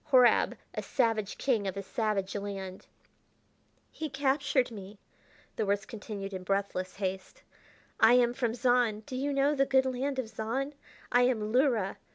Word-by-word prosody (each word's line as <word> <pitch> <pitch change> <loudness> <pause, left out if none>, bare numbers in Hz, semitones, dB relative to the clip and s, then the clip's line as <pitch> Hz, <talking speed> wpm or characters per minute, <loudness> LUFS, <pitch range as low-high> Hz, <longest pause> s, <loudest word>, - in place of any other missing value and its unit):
Horab 250 -3 +5 0.2
a - - -3
savage 225 -6 0
king 225 -7 +1
of 190 0 -3
a 200 - -3
savage 205 -2 -1
land 195 -2 -6 1.0
"He 315 -1 -5
captured 270 -2 +1
me," 205 -1 -9 0.6
the 220 - 0
words 200 +1 0
continued 205 -3 -7
in 185 - -4
breathless 185 -1 -2
haste. 190 - -4 0.6
"I 225 +2 +7
am 245 -1 +4
from 240 -3 -1
Zahn: 245 -3 +2
do 255 - -8
you 280 +3 -1
know 280 +1 +2
the 275 -2 +2
good 265 -1 +4
land 265 +2 -2
of 260 -3 -2
Zahn? 240 +6 -3 0.4
I 245 - +5
am 215 -4 -1
Luhra. 245 -7 +2
230 Hz, 160 wpm, -30 LUFS, 200-265 Hz, 1.0 s, I